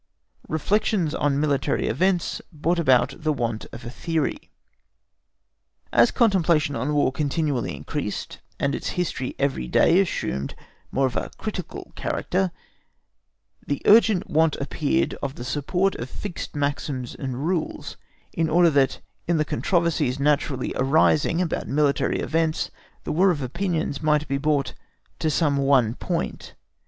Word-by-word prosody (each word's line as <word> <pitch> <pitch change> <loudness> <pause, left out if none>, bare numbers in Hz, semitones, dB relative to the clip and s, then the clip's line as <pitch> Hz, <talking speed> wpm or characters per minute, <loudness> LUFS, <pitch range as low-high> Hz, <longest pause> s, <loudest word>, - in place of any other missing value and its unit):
5. - - -8
REFLECTIONS 180 0 +1
ON 145 -1 +1
MILITARY 145 -2 0
EVENTS 180 - 0
BROUGHT 170 +2 0
ABOUT 130 -3 +3
THE 155 0 +1
WANT 115 -6 -2
OF 120 +1 -9
A 120 - -6
THEORY. 165 - -2 1.4
As - - +6
contemplation 170 - +2
on 140 +6 -1
War 145 -2 +3
continually 140 - -1
increased, 75 +1 -5 0.2
and 140 - +1
its - - -3
history 155 -7 -2
every 135 - -1
day 175 - +4
assumed 70 - -1 0.4
more 135 - +2
of 125 -3 -2
a - - -2
critical - - -6
character, 185 +1 -1 1.2
the 145 - -1
urgent 215 -3 +5
want 160 0 +2
appeared 150 +3 0
of 140 0 -3
the 120 - -7
support 180 +8 0
of 120 - -5
fixed 190 0 -6
maxims 140 -3 -2
and 130 +1 -4
rules, 175 -3 -2 0.4
in 165 -1 0
order 170 +1 +5
that 140 -2 +2 0.3
in 170 -1 +2
the 155 - +1
controversies 170 -7 0
naturally 140 -2 +1
arising 155 +4 +3
about 165 - -3
military 145 0 +1
events 160 0 0 0.3
the - - -3
war 185 +5 +4
of 150 -6 0
opinions 165 +1 -2
might 150 -1 +2
be 140 0 -1
brought 145 -2 0 0.5
to 160 - +1
some 150 -2 +2
one 135 -5 +3
point. 170 +6 -4
150 Hz, 140 wpm, -24 LUFS, 135-170 Hz, 1.4 s, As